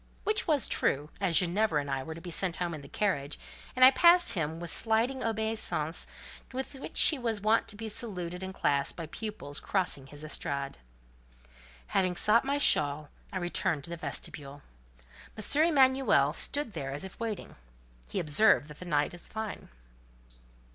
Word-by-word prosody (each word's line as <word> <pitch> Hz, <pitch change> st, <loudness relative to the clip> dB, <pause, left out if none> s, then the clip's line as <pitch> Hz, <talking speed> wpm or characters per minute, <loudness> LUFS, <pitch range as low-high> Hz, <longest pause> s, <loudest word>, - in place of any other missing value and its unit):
Which 430 Hz, 0 st, 0 dB
was 295 Hz, -, +2 dB
true, 145 Hz, +3 st, 0 dB
as 185 Hz, -5 st, +2 dB
Ginevra 180 Hz, -2 st, +2 dB
and 140 Hz, -1 st, -4 dB
I 135 Hz, -1 st, -1 dB
were 160 Hz, +4 st, -7 dB
to 165 Hz, -, -10 dB
be 175 Hz, 0 st, -7 dB
sent 175 Hz, 0 st, 0 dB
home 175 Hz, -1 st, -3 dB
in 155 Hz, -, -7 dB
the 140 Hz, -, -12 dB
carriage; 145 Hz, -6 st, -2 dB, 0.4 s
and 255 Hz, 0 st, +8 dB
I 260 Hz, -, +10 dB
passed 345 Hz, +2 st, +6 dB
him 160 Hz, -3 st, -2 dB
with 170 Hz, -1 st, -5 dB
the -, -, +4 dB
sliding 230 Hz, +4 st, +1 dB
obeisance 220 Hz, -8 st, -1 dB, 0.4 s
with 265 Hz, +2 st, -5 dB
which 270 Hz, -, -5 dB
he 305 Hz, -, +6 dB
was 230 Hz, -3 st, -1 dB
wont 215 Hz, +2 st, +2 dB
to 205 Hz, -, -7 dB
be 225 Hz, +2 st, -6 dB
saluted 180 Hz, -6 st, -4 dB
in 190 Hz, 0 st, -5 dB
classe 140 Hz, -6 st, 0 dB
by 165 Hz, -, -7 dB
pupils 210 Hz, -5 st, -4 dB
crossing 180 Hz, -9 st, -2 dB
his 145 Hz, +2 st, -10 dB
estrade. 140 Hz, -, -4 dB, 1.1 s
Having 185 Hz, -, 0 dB
sought 215 Hz, +6 st, +4 dB
my 280 Hz, +1 st, 0 dB
shawl, 150 Hz, -, +3 dB, 0.2 s
I 190 Hz, -, -4 dB
returned 175 Hz, -3 st, -1 dB
to 170 Hz, -, -10 dB
the -, -, -3 dB
vestibule. 145 Hz, -2 st, -7 dB, 0.7 s
M. 285 Hz, +8 st, +2 dB
Emanuel 260 Hz, -, +3 dB
stood 285 Hz, -, -1 dB
there 135 Hz, -4 st, -5 dB
as 145 Hz, +5 st, -5 dB
if 190 Hz, -, -10 dB
waiting. 225 Hz, -4 st, -5 dB, 0.5 s
He -, -, -2 dB
observed 155 Hz, 0 st, +3 dB
that 150 Hz, -, -12 dB
the 180 Hz, -, -8 dB
night 150 Hz, -4 st, 0 dB
was 175 Hz, -, -3 dB
fine. 220 Hz, -1 st, -6 dB
180 Hz, 175 wpm, -29 LUFS, 150-225 Hz, 1.1 s, I